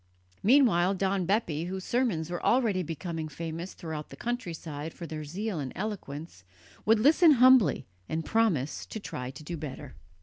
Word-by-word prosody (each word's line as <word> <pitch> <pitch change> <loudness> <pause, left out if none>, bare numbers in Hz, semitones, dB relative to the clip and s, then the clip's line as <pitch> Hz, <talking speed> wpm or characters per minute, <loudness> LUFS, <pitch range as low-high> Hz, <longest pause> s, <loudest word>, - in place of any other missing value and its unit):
Meanwhile 200 -7 +4
Don 190 -1 0
Bepi, 170 -6 0
whose 190 +1 -4
sermons 195 -11 0
were 175 - -4
already 225 -7 +3
becoming 165 -1 -4
famous 165 +4 -6
throughout 155 -2 -6
the - - -10
countryside 165 -10 -5
for 170 - -7
their 155 -1 -5
zeal 185 +4 -3
and 135 -3 -4
eloquence, 165 - -6 0.4
would 225 0 +5
listen 310 +6 +6
humbly 255 -3 +5 0.2
and 160 0 -2
promise 190 - +1
to 220 - -6
try 125 -10 -5
to 130 +3 -10
do 170 +3 -5
better. 145 -2 -7
175 Hz, 160 wpm, -29 LUFS, 155-220 Hz, 0.4 s, listen